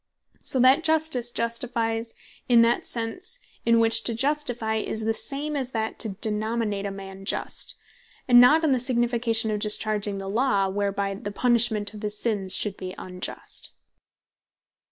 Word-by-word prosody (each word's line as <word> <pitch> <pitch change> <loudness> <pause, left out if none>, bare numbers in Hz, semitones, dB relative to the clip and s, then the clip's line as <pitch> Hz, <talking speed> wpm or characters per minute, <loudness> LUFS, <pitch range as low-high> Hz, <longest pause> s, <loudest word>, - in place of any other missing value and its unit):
So 260 - 0
that 265 +6 +5
Justice 315 -7 +2
Justifies 230 -1 -2 0.3
in 235 -1 +6
that 235 +1 +3
that - - -18
sense, 250 - -3 0.3
in 230 0 +5
which 225 0 +4
to 230 - 0
Justifie, 245 -4 -1
is 220 0 -4
the 225 - +1
same 290 +6 0
that 250 -6 -3
to 220 - +2
Denominate 215 -1 -1
A - - -3
Man 195 0 -9
Just; - - -2 0.5
and 245 -1 +8
not 305 +6 +6
in 310 - +2
the 260 - +2
signification 235 -2 0
of 210 - -1
discharging 210 -1 -1
the 195 0 -6
Law; 200 -2 +1
whereby 200 0 -2
the 205 +1 -6
punishment 225 -2 +2
of 210 - -10
his 210 -1 -2
sins 205 -5 0
should 205 -2 -1
be 185 0 -7
unjust. 180 0 -4
225 Hz, 155 wpm, -25 LUFS, 210-245 Hz, 0.5 s, and